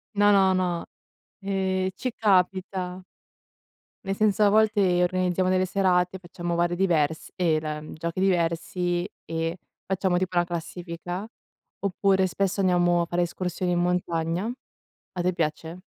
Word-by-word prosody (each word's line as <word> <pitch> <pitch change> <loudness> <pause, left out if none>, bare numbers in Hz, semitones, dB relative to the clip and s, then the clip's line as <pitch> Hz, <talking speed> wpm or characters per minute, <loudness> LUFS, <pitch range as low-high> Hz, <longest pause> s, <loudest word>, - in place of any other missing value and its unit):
No, 205 0 +5
no, 195 -2 +5
no. 180 -2 -1 0.6
Ehm, 190 -1 0
ci 255 +6 -3
capita. 185 -2 +1 1.0
Nel 195 0 -1
senso 210 0 +2
a 205 - +6
volte 205 -4 +3
organizziamo 185 0 +1
delle 185 0 +2
serate, 185 -1 +1
facciamo 175 -1 -4
vari 175 +1 +1
diverse 160 -4 0
ehm 165 -4 +2
la, 155 -1 -4
giochi 170 +3 -4
diversi 175 0 0 0.2
e 165 +1 -2 0.3
facciamo 190 -1 +1
tipo 185 0 -1
la 175 - +5
classifica, 175 +2 -5 0.5
oppure 195 -1 +2
spesso 195 +2 -1
andiamo 175 -2 +3
a - - 0
fare 175 +1 0
escursioni 180 +1 -2
in 175 - +1
montagna. 175 +2 0 0.6
A 180 - -2
te 180 +1 +1
piace? 165 +1 -3
180 Hz, 135 wpm, -26 LUFS, 175-190 Hz, 1.0 s, a